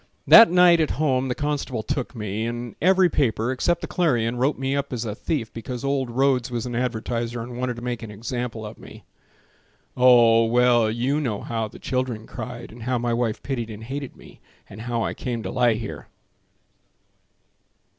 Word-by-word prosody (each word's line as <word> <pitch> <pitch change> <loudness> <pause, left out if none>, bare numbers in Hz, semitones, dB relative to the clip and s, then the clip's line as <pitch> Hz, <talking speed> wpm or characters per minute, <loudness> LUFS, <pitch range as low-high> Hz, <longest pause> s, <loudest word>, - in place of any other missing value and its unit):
That 230 - +9
night 175 -1 +6
at 155 - +1
home 135 -4 +1
the 125 - -2
constable 145 -6 -2
took 130 +2 -3
me 105 0 -3
And 120 0 -5
every 185 +1 +5
paper, 125 -6 0
except 170 +7 0
the - - -4
Clarion, 120 -9 +1
Wrote 135 +4 +1
me 135 +1 -1
up 140 0 -2
as 120 -2 -3
a 105 - -3
thief 115 0 -3
Because 120 +2 -6
old 135 -2 -1
Rhodes 130 0 +1
was 120 -1 -3
an 125 - -5
advertiser 120 -1 -2
And 120 +1 -7
wanted 125 -1 -2
to 120 - -9
make 120 -3 -3
an 115 - -7
example 115 +1 -5
of 105 - -9
me. - - -13 0.9
Oh! 120 -2 +6
well, 120 -1 +3
you 125 +7 0
know 110 -8 -2
how 115 -1 -3
the - - -13
children 125 -4 -3
cried, - - -8
And 115 +2 -12
how 125 +2 -1
my 120 0 -1
wife 115 -2 -1
pitied 120 -5 -3
and 110 0 -8
hated 135 +3 -6
me, - - -16 0.3
And 105 - -10
how 115 -1 -2
I - - -2
came 120 -3 -4
to 95 - -4
lie 120 -3 +3
here. 110 -1 -7
120 Hz, 190 wpm, -23 LUFS, 115-135 Hz, 0.9 s, That